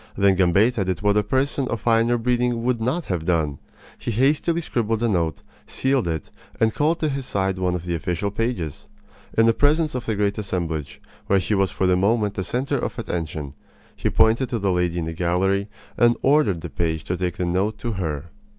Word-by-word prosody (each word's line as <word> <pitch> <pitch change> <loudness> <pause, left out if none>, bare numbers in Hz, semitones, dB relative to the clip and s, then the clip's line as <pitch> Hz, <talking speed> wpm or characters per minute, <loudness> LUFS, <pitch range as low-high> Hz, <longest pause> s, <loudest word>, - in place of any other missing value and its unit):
Then 100 -1 +4
Gambetta 100 +5 +3
did 95 +2 -3
what 105 0 +3
a 105 - +4
person 130 +5 0
of 115 - -2
finer 115 +1 +3
breeding 120 0 0
would 120 -2 0
not 140 +9 -1
have 90 -4 -2
done. 80 -5 0 0.4
He - - -4
hastily 145 +8 +2
scribbled 115 -6 -1
a - - +3
note, 85 -7 0 0.2
sealed 130 -5 0
it, 80 -2 -3 0.3
and 110 -1 +3
called 160 +3 +1
to 155 - +1
his 135 -2 -3
side 95 -1 -1
one 90 -1 0
of 90 -1 -5
the 85 - -2
official 90 +4 -2
pages. 100 - -3 0.5
In 115 - +6
the 115 - +5
presence 150 +4 +2
of 125 -1 -4
the 110 - 0
great 100 0 0
assemblage, 85 -7 -3 0.3
where 100 - +4
he 95 +3 0
was 95 -2 +2
for 95 - -1
the 90 0 +4
moment 105 +2 +2
the 95 - -3
center 130 +6 -1
of - - -4
attention, 80 - -4 0.4
he - - -1
pointed 115 +4 +3
to 120 - -1
the 100 -3 0
lady 90 -1 0
in 85 - -1
the 80 - -4
gallery 95 +4 0 0.3
and 120 0 +4
ordered 130 - +3
the 85 - -6
page 80 -2 -1
to 90 - -2
take 90 0 -2
the 90 - -1
note 95 +5 0
to 120 - -4
her. 80 -5 -4
100 Hz, 210 wpm, -23 LUFS, 90-120 Hz, 0.5 s, In